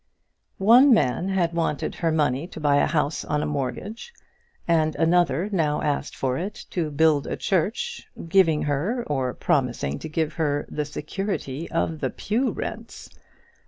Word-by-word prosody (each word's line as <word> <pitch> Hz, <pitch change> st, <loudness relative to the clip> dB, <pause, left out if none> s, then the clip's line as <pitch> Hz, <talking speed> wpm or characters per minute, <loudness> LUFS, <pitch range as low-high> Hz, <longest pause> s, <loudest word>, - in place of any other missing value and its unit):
One 240 Hz, +6 st, +7 dB
man 145 Hz, -, +1 dB
had 175 Hz, -3 st, +1 dB
wanted 165 Hz, -3 st, -1 dB
her 165 Hz, -2 st, -1 dB
money 150 Hz, -1 st, +1 dB
to -, -, -10 dB
buy 145 Hz, -2 st, +3 dB
a -, -, +3 dB
house 150 Hz, 0 st, 0 dB
on 150 Hz, 0 st, -1 dB
a -, -, -1 dB
mortgage, 150 Hz, -, -4 dB, 0.6 s
and 155 Hz, -2 st, +2 dB
another 170 Hz, 0 st, +2 dB
now 155 Hz, -6 st, 0 dB
asked 145 Hz, -1 st, -1 dB
for 130 Hz, -1 st, -1 dB
it 195 Hz, +4 st, -6 dB
to 165 Hz, -4 st, -1 dB
build 150 Hz, -1 st, +2 dB
a -, -, -3 dB
church, 190 Hz, +4 st, -1 dB, 0.2 s
giving 165 Hz, -3 st, +3 dB
her, 170 Hz, -, -1 dB
or 130 Hz, -4 st, -1 dB
promising 120 Hz, -, 0 dB
to -, -, -7 dB
give 155 Hz, 0 st, -1 dB
her, 145 Hz, -3 st, -1 dB
the 150 Hz, -, -2 dB
security 155 Hz, -1 st, -4 dB
of 165 Hz, -1 st, -1 dB
the -, -, -1 dB
pew 240 Hz, +5 st, -1 dB
rents. -, -, -7 dB
160 Hz, 160 wpm, -24 LUFS, 145-180 Hz, 0.6 s, One